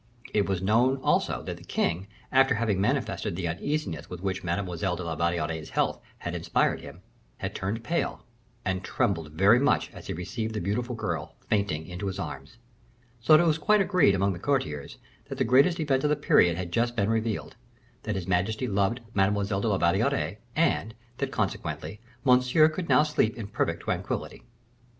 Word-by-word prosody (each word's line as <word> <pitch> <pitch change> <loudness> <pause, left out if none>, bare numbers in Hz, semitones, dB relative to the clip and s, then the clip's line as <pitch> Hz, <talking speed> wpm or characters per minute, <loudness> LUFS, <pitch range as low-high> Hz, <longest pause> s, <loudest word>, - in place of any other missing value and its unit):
It 100 -2 +2
was 95 -1 -1
known, 120 +7 +3
also, - - +1
that - - -5
the - - -14
king, 85 +5 -1 0.2
after 135 0 +5
having 105 -4 0
manifested 100 - -1
the 90 -1 -2
uneasiness 90 - -3
with 90 - -7
which 95 -1 -2
Mademoiselle 90 0 -1
de 90 - -5
la 85 -1 -3
Valliere's 80 -1 -1
health - - 0 0.2
had - - -5
inspired - - 0
him, - - -11 0.4
had - - -4
turned 105 +4 -3
pale, 170 +9 -2 0.4
and 95 -1 -1
trembled 85 -6 -1
very 100 +8 +5
much 140 +2 +2
as - - -11
he - - -2
received 110 +6 -4
the - - -1
beautiful 120 +7 -2
girl - - -4
fainting 100 -7 0
into 90 +4 -5
his 95 - -3
arms; 70 - -7 0.6
so 155 +7 +7
that 170 - +4
it - - +1
was 160 -1 +2
quite 210 +6 +4
agreed 180 - +4
among 100 +1 +1
the 85 - -7
courtiers, 80 - -2 0.3
that - - -7
the - - +2
greatest 140 +9 +4
event 135 -4 +1
of 150 - +2
the 150 - +3
period 90 - +4
had 90 -2 -4
just 120 +5 +1
been 100 -3 +1
revealed; 110 -1 -2 0.5
that 110 -2 -3
his 95 -2 -4
majesty 100 +7 0
loved 100 +3 0
Mademoiselle 100 0 +1
de 115 - 0
la 100 -3 +2
Valliere, 85 -1 +1 0.2
and 155 -8 +1 0.2
that, - - -1
consequently, 105 - -3 0.3
Monsieur 125 +4 +5
could 165 +2 -5
now 150 - +6
sleep 150 -7 +1
in 115 - -5
perfect 100 - -2
tranquillity. - - -3
100 Hz, 185 wpm, -27 LUFS, 90-125 Hz, 0.6 s, so